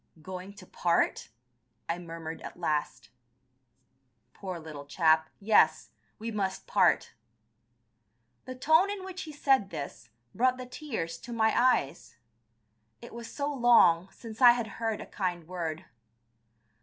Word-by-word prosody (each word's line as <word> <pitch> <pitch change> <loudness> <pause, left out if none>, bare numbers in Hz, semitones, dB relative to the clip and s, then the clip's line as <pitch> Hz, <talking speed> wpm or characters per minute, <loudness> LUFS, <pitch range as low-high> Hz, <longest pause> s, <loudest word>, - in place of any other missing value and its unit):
"Going 185 +2 -7
to 195 -2 -13
part!" 170 -1 0 0.6
I 170 +1 -2
murmured 165 -1 -7
at - - -9
last. 150 -6 -2 1.2
"Poor 185 -3 -6
little 150 -3 -9
chap, 160 0 +3
yes, 210 +1 +3 0.3
we 230 +1 -5
must 195 -3 -3
part." - - +2 1.3
The 255 - -7
tone 315 +9 +4
in 400 -2 -5
which 370 -1 -7
he 310 - -8
said 270 -8 +2
this 115 - -7 0.2
brought 255 +2 +2
the 255 - -7
tears 220 - -5
to 240 - -10
my 220 -1 +2
eyes. 240 - +1 0.8
It - - -12
was 235 0 -8
so 290 0 -2
long 230 -9 +5
since 225 0 -11
I 245 -1 +9
had 240 -1 -2 0.2
heard 225 -2 -1
a - - -7
kind 175 -4 -4
word. 170 -1 -4
195 Hz, 135 wpm, -29 LUFS, 165-245 Hz, 1.3 s, I